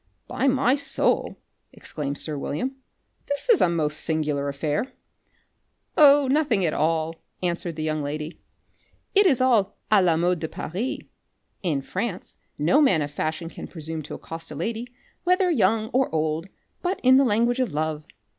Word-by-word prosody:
"By 275 - 0
my 260 -1 +3
soul," 280 0 0 0.3
exclaimed 145 -2 -5
sir 155 0 -3
William, 170 - -3 0.5
"this 285 - -2
is 460 - +7
the 180 - +4
most 155 -3 -1
singular 150 -3 -1
affair!" 150 - -2 1.0
"Oh, 285 -2 +7
nothing 265 - +2
at 155 - 0
all," 160 +1 0 0.2
answered 170 -1 -2
the 155 - -4
young 155 -1 -1
lady. 150 +3 -5 0.7
"It 405 -1 +6
is 275 -8 +3
all 235 -7 +2
à 205 -3 +6
la 170 -3 +3
mode 175 +1 +1
de 160 - -3
Paris. 200 +11 -4 0.6
In 150 -7 -1
France 190 - -4 0.2
no 170 - +3
man 185 - +4
of 145 - -5
fashion 155 +2 -3
can - - -8
presume 160 -1 -6
to 150 - -7
accost 165 0 -8
a 150 - -7
lady, 225 +9 -3 0.4
whether 365 0 +3
young 220 -5 +2
or 260 +2 +1
old, 160 +2 -1 0.3
but 370 +2 -1
in 260 +1 +7
the 275 - +5
language 235 +1 +2
of 255 -7 0
love. 155 0 -2
175 Hz, 165 wpm, -24 LUFS, 155-260 Hz, 1.0 s, is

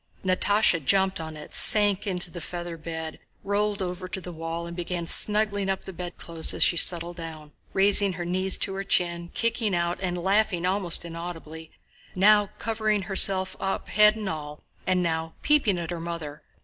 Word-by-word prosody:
Natásha 185 -2 +2
jumped 190 +5 +1
on 160 -1 -8
it, 150 - -11
sank 205 -1 +5
into 180 -2 -1
the 175 - -8
feather 175 0 -6
bed, 160 0 -7 0.2
rolled 205 0 -1
over 180 0 -6
to 190 +1 -5
the 180 -1 -9
wall, 165 +1 -6
and 170 0 -8
began 175 -1 -4
snuggling 210 +1 +2
up 190 0 -2
the 190 - -9
bedclothes 170 -1 -1
as - - +3
she - - +4
settled 170 0 +3
down, 160 -3 -9 0.2
raising 200 0 +3
her 175 0 -6
knees 185 +2 0
to 195 - -3
her 195 0 -4
chin, 170 -2 -1
kicking 230 -4 -1
out 170 0 -2
and 180 -2 -2
laughing 190 0 0
almost 185 -3 0
inaudibly, 165 -1 -8 0.5
now 205 +1 +4
covering 215 -2 -1
herself 190 0 +5
up 195 - -4
head 210 0 +5
and 215 -2 -6
all, 150 -3 -7 0.2
and 185 -1 +1
now 160 -1 -3
peeping 285 -11 +2
at 170 -1 -5
her 175 - -4
mother. 165 -3 -7
180 Hz, 175 wpm, -25 LUFS, 170-195 Hz, 0.5 s, sank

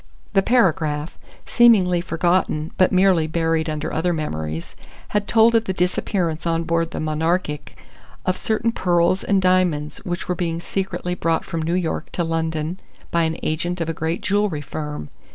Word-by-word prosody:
The 195 - +5
paragraph, 160 -9 +1 0.3
seemingly 195 -8 +5
forgotten 170 -2 0
but 185 - +3
merely 185 -4 +4
buried 165 0 0
under 155 0 -3
other 175 +2 +1
memories, 80 - -4 0.3
had 205 0 -1
told 230 +1 +5
of 225 -1 +3
the 190 - -1
disappearance 180 -2 -1
on 165 0 +1
board 165 0 0
the - - -5
Monarchic 155 -1 -1 0.5
of 185 - +1
certain 225 +3 0
pearls 175 -2 +2
and 200 -1 +2
diamonds 185 -5 +1
which 175 0 -4
were 180 - +1
being 170 -2 -2
secretly 185 0 -3
brought 165 -2 0
from 165 -3 -3
New 165 +2 0
York 180 -3 -2
to 175 - 0
London 165 +1 -2 0.3
by 170 -2 +2
an 160 0 -2
agent 175 +3 -1
of 165 -1 -2
a - - -1
great 160 +2 -2
jewellery 205 -6 0
firm. 150 - -6
170 Hz, 165 wpm, -22 LUFS, 160-185 Hz, 0.5 s, The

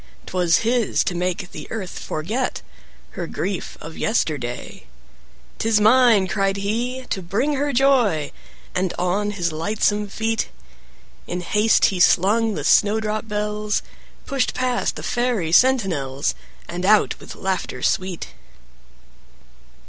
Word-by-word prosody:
'Twas 175 0 +2
his 235 -1 +2
to 185 - -2
make 180 +1 -2
the - - -8
Earth 200 -5 -5
forget 215 +12 -3 0.5
Her - - -5
grief 190 0 -4
of 160 +1 -9
yesterday. 145 - -2 0.7
"'Tis 220 -1 +3
mine," 220 -2 +5
cried 195 0 0
he, 240 +6 -2
"to 190 - -1
bring 220 +12 0
her 285 +1 0
joy!" 240 - +2 0.4
And 185 -1 -1
on 185 +4 0
his 180 -5 -1
lightsome 205 +5 0
feet 225 +2 -1 0.8
In 180 +1 -3
haste 210 +5 +3
he 185 - -3
slung 210 +5 +4
the - - -4
snowdrop 215 +1 +2
bells, 210 0 -1 0.4
Pushed 275 -3 -1
past 255 -1 0
the - - -7
Fairy 240 -9 0
sentinels, 170 - +2 0.3
And 175 +1 -5
out 210 +2 +3
with - - -10
laughter 190 -1 -3
sweet. 185 -2 -1
205 Hz, 125 wpm, -22 LUFS, 180-225 Hz, 0.8 s, mine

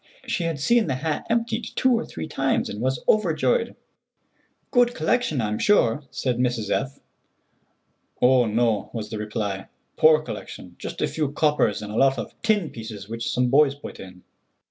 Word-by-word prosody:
She 170 - -1
had 165 -4 -2
seen 235 +7 +3
the 135 - 0
hat 150 +3 -3
emptied 230 0 -1
two 260 - +3
or 235 0 +1
three 80 -1 -6
times, - - 0
and 105 - -6
was 130 +1 -1
overjoyed. 460 - +2 1.0
"Good 245 -1 +3
collection, 160 - 0
I'm 105 -1 -2
sure," 145 - +3
said 125 -2 -2
Mrs. 120 -4 0
F. 135 0 -1 1.2
"Oh, 125 -1 +4
no," 110 -1 +1
was 110 -2 -5
the 110 - -4
reply, 105 -2 -3 0.3
"poor 155 0 +5
collection; 105 -9 -8
just - - -5
a - - +2
few 150 -3 -2
coppers 150 -8 +1
and 105 - -6
a 110 - -4
lot 135 -1 +4
of - - -5
tin 210 -7 +1
pieces 110 -3 -8
which 115 +1 -4
some 125 0 +1
boys 140 0 +5
put 145 - -10
in." 90 -1 -11
130 Hz, 170 wpm, -24 LUFS, 110-165 Hz, 1.2 s, poor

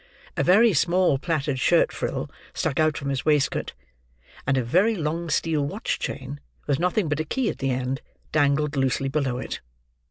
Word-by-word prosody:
A - - 0
very 215 +5 +5
small 170 -2 +3
plaited 145 -4 -1
shirt - - +4
frill - - -3 0.3
stuck 140 - -1
out 155 -1 +2
from 140 - -3
his 135 -1 -1
waistcoat; 150 -3 +1 0.7
and 135 -1 +2
a 130 - +1
very 185 - +3
long 165 0 -2
steel 155 -1 +1
watch 195 +10 -2
chain, 135 +1 -5 0.3
with 140 -2 0
nothing 180 +2 +1
but 145 0 -1
a - - +1
key 240 - -1
at - - -5
the 135 - 0
end, 130 +2 -1 0.3
dangled 145 0 +2
loosely 135 0 +1
below 135 -3 -1
it. 125 - -5
150 Hz, 180 wpm, -25 LUFS, 135-170 Hz, 0.7 s, very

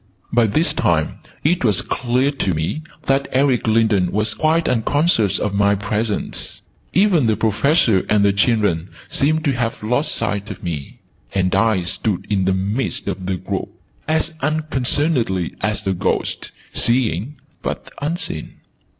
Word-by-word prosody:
By 120 -1 +4
this 155 +11 +2
time 80 -2 0 0.2
it 170 +2 +2
was 105 -7 +2
clear 125 +3 0
to 100 - -1
me 80 - -2 0.2
that 135 0 +1
Eric 130 -3 +2
Lindon 110 -5 +3
was 105 +1 0
quite 160 +1 +1
unconscious 125 - +2
of 105 - -2
my 100 0 +3
presence. 105 +1 -3 0.3
Even 185 - +3
the 110 - +3
Professor 110 - +3
and 105 -1 +4
the 100 - +4
children 100 -5 +1 0.2
seemed 155 +3 +1
to 140 - +3
have 120 -4 -2
lost 125 +8 0
sight 105 -2 -2
of - - -8
me: 80 -6 -5 0.3
and 90 -1 +1
I 100 -1 +2
stood 90 +3 -1
in 95 -2 +2
the 95 - +2
midst 100 +7 -2
of 95 -2 -3
the 95 - 0
group, - - -4 0.4
as 160 +1 +1
unconcernedly 135 - +1
as 105 +1 -1
a 95 - +1
ghost, 90 - -2 0.2
seeing 120 - +1 0.3
but - - -5
unseen. 150 - -3
110 Hz, 150 wpm, -20 LUFS, 100-140 Hz, 0.4 s, By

